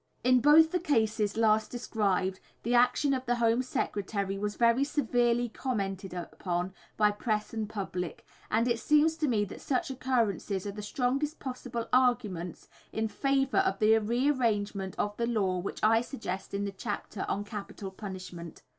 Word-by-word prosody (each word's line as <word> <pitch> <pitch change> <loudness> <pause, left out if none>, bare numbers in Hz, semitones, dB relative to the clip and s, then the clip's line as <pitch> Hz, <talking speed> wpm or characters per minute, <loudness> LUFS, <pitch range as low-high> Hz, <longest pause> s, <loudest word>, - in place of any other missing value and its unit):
In 255 +1 +5
both 315 +3 +7
the 360 - +1
cases 220 - +1
last 220 -1 +3
described 195 -6 -1 0.2
the 235 - 0
action 250 +3 +4
of 260 -1 -3
the 245 - +2
Home 235 +1 +2
Secretary 200 -5 -2
was 205 +1 -3
very 235 +3 +4
severely 245 -4 +1
commented 195 -6 -3
upon 180 +1 -3 0.2
by 210 -1 +4
press 210 0 -2
and 220 -2 -3
public, 185 -5 -4 0.2
and 230 +3 +2
it 235 -1 +1
seems 300 +4 +4
to 310 -1 0
me 215 -5 +2
that - - -10
such 265 0 -1
occurrences 230 -7 -1
are 200 - -3
the 210 +1 -7
strongest 270 +8 -1
possible 250 -3 -5
arguments 235 -9 +1 0.2
in 220 0 -1
favour 275 - +1
of 385 0 +1
the 215 +1 +5
re 235 +5 0
arrangement 205 -8 0
of 205 0 -1
the 235 - 0
law 195 -6 +1
which 185 - -5
I 225 +1 +5
suggest 220 -7 -5
in 200 +1 -1
the 200 - -3
chapter 205 0 -5
on 200 - -1
"Capital 205 -2 -7
Punishment." 185 -4 -8
220 Hz, 165 wpm, -30 LUFS, 200-250 Hz, 0.2 s, both